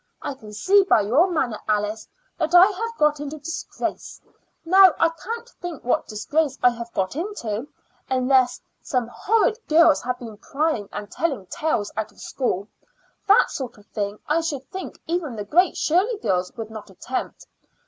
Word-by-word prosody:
I - - -4
can 215 -5 -13
see 380 - +4
by 365 - +4
your 265 - +3
manner, 260 -10 -1
Alice, 210 0 -1 0.3
that 330 - +1
I 355 +1 +10
have 450 +3 -3
got 300 -1 +3
into 295 +1 -5
disgrace. 330 +4 -5 0.5
Now, 375 0 +7
I 335 - +4
can't 460 +9 -7
think 350 - -8
what 245 - 0
disgrace 275 +6 -1
I 245 - +7
have 235 0 -7
got 190 +5 -1
into, 290 - -4 0.4
unless 255 -1 +3 0.2
some 250 -3 -1
horrid 440 - +1
girls 315 -1 +5
have 250 0 -2
been 230 -4 -9
prying 275 -6 -1
and 205 0 -7
telling 275 - -2
tales 210 - -1
out 220 0 -3
of - - -22
school. 210 -7 -2 0.6
That 410 +3 +5
sort 260 -5 -5
of 205 - -18
thing 205 -1 -3
I 310 +3 +2
should 285 -5 -4
think 380 - -7
even 325 -7 -2
the 210 -2 -5
Great 350 - +3
Shirley 385 +9 +2
girls 180 - -1
would 225 -1 -6
not 215 -2 -9
attempt. 195 +7 -5
275 Hz, 170 wpm, -23 LUFS, 220-335 Hz, 0.6 s, I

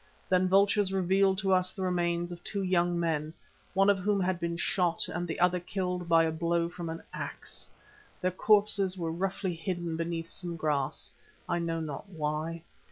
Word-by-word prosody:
Then 185 0 +4
vultures 200 +1 +4
revealed 190 +1 +3
to 195 -1 +2
us 185 0 +3
the 190 - -4
remains 175 -1 0
of 175 0 -8
two 200 -2 -2
young 175 -1 +2
men, 160 -1 -1 0.4
one 195 +1 +5
of 200 -1 +4
whom 200 +2 +1
had 185 -1 0
been 170 0 -2
shot 175 -1 +1
and 175 0 -3
the 160 - -4
other 180 0 +3
killed 180 -1 -3
by 165 0 +6
a 160 - +1
blow 170 +1 0
from 175 -1 -6
an 165 0 -6
axe. - - -6 0.5
Their 185 - +1
corpses 200 -1 +3
were 165 -2 -2
roughly 190 +2 -1
hidden 170 0 -3
beneath 165 0 -3
some 175 -2 -4
grass, 150 -3 -1 0.4
I 170 - 0
know 165 -1 -1
not 155 +4 -6
why. 160 0 -3
175 Hz, 180 wpm, -30 LUFS, 165-190 Hz, 0.5 s, by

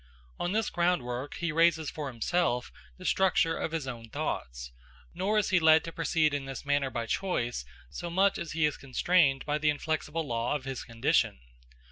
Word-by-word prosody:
On 175 - -1
this 220 +1 0
groundwork 145 -7 -1
he 170 -1 -2
raises 160 -1 +3
for 150 -2 -5
himself 125 +1 0 0.3
the 185 - -11
structure 180 -4 +3
of - - -3
his 160 -4 -3
own 115 -3 -7
thoughts; - - -4 0.4
nor 195 +5 0
is 210 - +2
he 185 - +5
led 160 -1 +6
to 165 - -6
proceed 160 -2 +1
in 140 -1 -2
this 135 0 -7
manner 145 -1 +1
by 120 -3 -3
choice 120 - -1 0.3
so 170 - -5
much 190 +3 +2
as 165 - -5
he 160 -1 +2
is 150 - 0
constrained 140 0 +2
by 150 0 0
the 150 0 +2
inflexible 155 +1 -2
law 120 +1 -1
of 140 -2 -4
his 135 -1 -4
condition. 115 - +1
150 Hz, 185 wpm, -29 LUFS, 130-170 Hz, 0.4 s, led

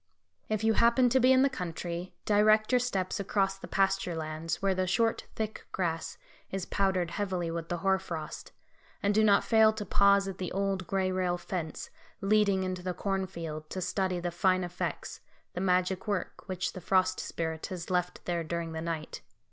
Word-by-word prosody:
If 215 0 -1
you 220 0 +4
happen 235 +3 +4
to 260 +2 +4
be 255 +1 +5
in 260 0 +6
the - - +5
country, 175 -5 -5
direct 215 +1 +4
your 250 - +5
steps 200 -6 -1
across 195 -1 0
the - - -8
pasture 195 -2 +1
lands, 160 +1 -3
where 195 -1 +2
the 185 0 0
short 225 +5 +1
thick 220 -1 -4
grass 165 -3 -2 0.3
is 190 -1 -3
powdered 190 -4 0
heavily 185 -5 -2
with 165 0 -4
the 175 - -1
hoar 190 0 +4
frost, 165 -4 -6 0.5
and 205 +1 +3
do 220 +1 +4
not 205 -2 +5
fail 220 -1 +5
to 215 -1 -5
pause 200 +1 +4
at 190 -1 -6
the 185 - -3
old, 195 -1 -1
gray 190 -1 0
rail 180 -1 0
fence, 175 -3 -5 0.3
leading 200 -1 +3
into 185 -1 -3
the 180 0 -3
cornfield, 170 -6 -3
to 190 - -4
study 185 0 -1
the 175 0 -2
fine 185 +1 +2
effects, 175 0 -4 0.3
the 180 - -3
magic 185 +1 +1
work 200 -4 -3
which 185 -1 -2
the 185 - -8
Frost 185 +1 +2
Spirit 160 -1 -3
has 180 -1 -6
left 180 0 -1
there 170 -1 -1
during 165 0 -3
the 160 0 -4
night. 165 -2 -4
185 Hz, 190 wpm, -30 LUFS, 175-200 Hz, 0.5 s, in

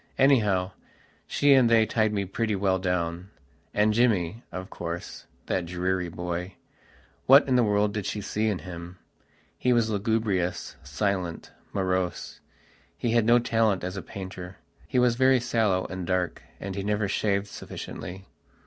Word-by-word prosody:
Anyhow, 105 -9 +3 0.6
she 145 -1 +4
and 130 -3 +5
they 115 -1 +5
tied 110 0 +1
me 100 -2 -1
pretty 105 +3 -1
well 95 -1 +1
downand 90 -1 -1 0.7
Jimmy, 110 -3 +1
of 95 +2 -7
course, 85 0 -6 0.2
that 90 -2 -1
dreary 90 0 -1
boywhat 90 - 0
in 130 - +2
the 125 - +5
world 105 -1 +2
did 105 -2 -3
she 105 - -3
see 105 +2 -1
in 105 -4 0
him? 85 0 -8 0.6
He 125 - +2
was 115 -2 +2
lugubrious, 100 -4 -1
silent, 90 +4 -2 0.2
morose. 95 -2 -2 0.6
He 120 - -1
had 115 -1 +3
no 120 +1 +6
talent 115 -5 +1
as 90 +1 -4
a 95 - -4
painter. 95 -1 -8 0.3
He - - -2
was 125 -1 +4
very 130 0 +5
sallow 105 -6 +1
and 95 -2 -5
dark, 90 -2 -1 0.2
and 95 0 -5
he 100 - -3
never 105 +1 0
shaved 100 0 0
sufficiently. 95 -1 -8
100 Hz, 150 wpm, -27 LUFS, 90-110 Hz, 0.7 s, no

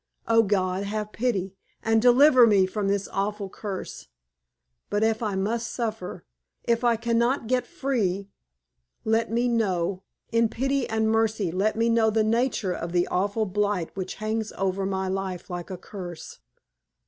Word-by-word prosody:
Oh, 230 0 +5
God, 190 -2 0
have 210 +1 -3
pity, 200 -6 -1 0.3
and 225 0 +3
deliver 250 +1 +7
me 200 -3 +5
from 200 +2 -2
this 200 0 0
awful 200 0 -2
curse! 200 -3 -6 0.8
But 205 +1 +1
if 220 0 +1
I 210 -4 -1
must 225 +5 -1
suffer 220 -6 -4 0.4
if 235 0 +1
I 240 -1 +4
can 230 +1 0
not 240 +1 +1
get 250 +1 0
free 200 -8 -1 0.8
let 225 0 +1
me 240 +2 +1
know 190 -6 0 0.3
in 230 -1 +3
pity 270 +3 -1
and 220 0 +1
mercy 220 -5 +1
let 195 +5 +1
me 230 +1 +2
know 230 -1 +3
the 220 0 +2
nature 225 -4 +1
of 170 0 -5
the 175 0 +3
awful 205 +4 0
blight 205 -3 -1
which 190 -1 -4
hangs 215 0 -2
over 195 0 -1
my 190 -1 -1
life 190 -1 -4
like 175 -1 -5
a 185 - -5
curse!" 175 -2 -9
215 Hz, 160 wpm, -26 LUFS, 190-230 Hz, 0.8 s, deliver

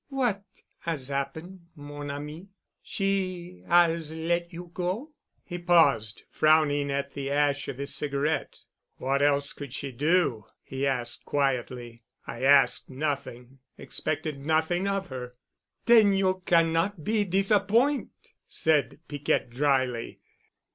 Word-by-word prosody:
"What 245 -8 0 0.4
'as 150 -6 -3
happen', 160 +6 -5
mon 145 0 -8
ami? 150 +5 -7 0.3
She 185 -2 -2
'as 170 -2 +3
let 170 +2 -1
you 175 0 -9
go?" 190 - -3 0.3
He 175 -2 -6
paused, 145 - +3
frowning 150 -2 +3
at 140 0 -2
the 140 -1 -4
ash 145 0 +1
of 130 - -5
his 140 +1 -4
cigarette. 145 +1 -2 0.4
"What 135 +2 0
else 145 0 +2
could 140 -4 -8
she 140 0 -4
do?" 145 - +1 0.2
he 135 +1 -2
asked 125 -3 -2
quietly. 125 -4 -2 0.2
"I 120 - -7
asked 140 +1 +4
nothing—expected 135 +2 -4
nothing 160 +5 +1
of 195 -2 -2
her." 125 -1 -7 0.5
"Then 220 -4 +6
you 190 -1 +1
cannot 165 +1 +2
be 215 +2 +1
disappoint'!" 205 +8 +1
said 145 -4 +1
Piquette 145 -4 -1
dryly. 130 -3 0
150 Hz, 120 wpm, -27 LUFS, 140-175 Hz, 0.5 s, Then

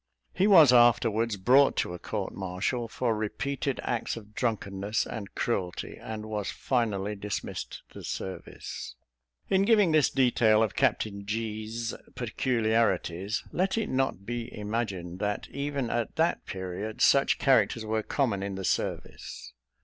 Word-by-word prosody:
He 190 +2 +2
was 160 -10 +8
afterwards 115 -2 +4
brought 130 +8 +5
to - - 0
a 90 - -7
court 100 +1 -4
martial, 95 +6 -2
for 115 0 -1
repeated 130 +6 -2
acts 120 -1 -2
of 105 -1 -11
drunkenness 105 -3 -1
and 100 -3 -7
cruelty, 95 -7 -2
and 110 -1 -7
was 105 -2 -3
finally 105 -5 -1
dismissed 100 0 -5
the - - -9
service. 95 - -6 0.5
In 190 - +3
giving 205 -4 +4
this 155 -3 +4
detail 115 -4 +4
of 110 - -1
Captain 105 -6 0
G 110 0 -3
's 115 +1 -3 0.2
peculiarities, 110 -5 0
let 190 +4 0
it 220 -2 -1
not 130 -7 -1
be 120 +1 -4
imagined, 100 -5 -3
that 105 0 -2
even 140 -3 -2
at 120 -1 -2
that 165 +2 +1
period 95 +3 -5
such 140 0 +5
characters 115 -4 +3
were 110 0 0
common 115 -4 0
in 100 0 -3
the 95 0 -4
service. - - -3
110 Hz, 140 wpm, -28 LUFS, 100-125 Hz, 0.5 s, was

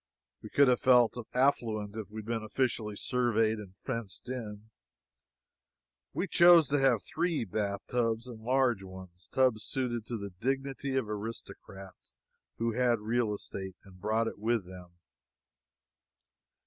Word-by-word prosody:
We - - -9
could 140 -1 +5
have 125 -1 +4
felt 125 -3 +5 0.2
affluent 110 -6 +1
if 110 -3 -6
we 110 +1 -6
had - - -15
been 115 0 -2
officially 110 -2 -1
surveyed 115 -2 +1
and 95 -3 -10
fenced 115 -6 -5
in. 110 -4 -6 1.4
We - - -1
chose 170 -2 +7
to 145 0 +2
have 130 -5 +3
three 165 -6 -1
bathtubs, 110 +4 -1
and 120 -3 -10
large 125 -2 +2
ones 95 -1 -12
tubs 125 -5 +2
suited 120 -4 -3
to 120 - -3
the 100 -1 -6
dignity 135 +6 -2
of 130 -5 0
aristocrats 100 - -8 0.4
who 115 0 0
had 120 0 +2
real 110 +1 0
estate, 95 -2 -6
and 95 -2 -16
brought 110 +3 +1
it - - -6
with 110 -2 0
them. 90 -1 -12
115 Hz, 140 wpm, -31 LUFS, 105-125 Hz, 1.4 s, chose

